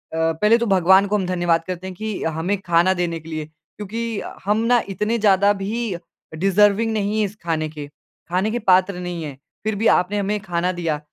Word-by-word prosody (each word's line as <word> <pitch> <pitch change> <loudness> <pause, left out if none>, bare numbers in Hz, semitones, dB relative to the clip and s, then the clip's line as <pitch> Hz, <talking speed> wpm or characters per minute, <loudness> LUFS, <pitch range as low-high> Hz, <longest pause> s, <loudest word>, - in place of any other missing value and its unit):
पहले 165 +8 +3
तो 235 - -1
भगवान 190 +2 +5
को 210 - 0
हम 190 - -2
धन्यवाद 175 -2 +1
करते 185 0 -5
हैं 185 - -7
कि 215 +2 -4
हमें 165 +5 -1
खाना 175 +1 +3
देने 175 -2 -2
के 160 +1 -13
लिए, 155 -1 -4
क्योंकि 210 +8 -6
अ, - - -8
हम 210 +1 +2
ना 240 -1 +4
इतने 210 +4 -1
ज़्यादा 200 -1 +4
भी 205 +1 -3 0.4
डिज़र्विंग 205 +4 +3
नहीं 210 0 -1
है 215 - +2
इस 200 +1 -7
खाने 160 -2 -1
के, 150 -1 -8
खाने 180 +7 -4
के 240 - -1
पात्र 185 -2 +3
नहीं 175 -2 -5
हैं 145 -3 -7 0.3
फिर 215 0 -1
भी 225 - +3
आपने 185 +3 +2
हमें 205 +1 -1
खाना 175 -1 -1
दिया 160 -3 -1
190 Hz, 205 wpm, -21 LUFS, 170-210 Hz, 0.4 s, भगवान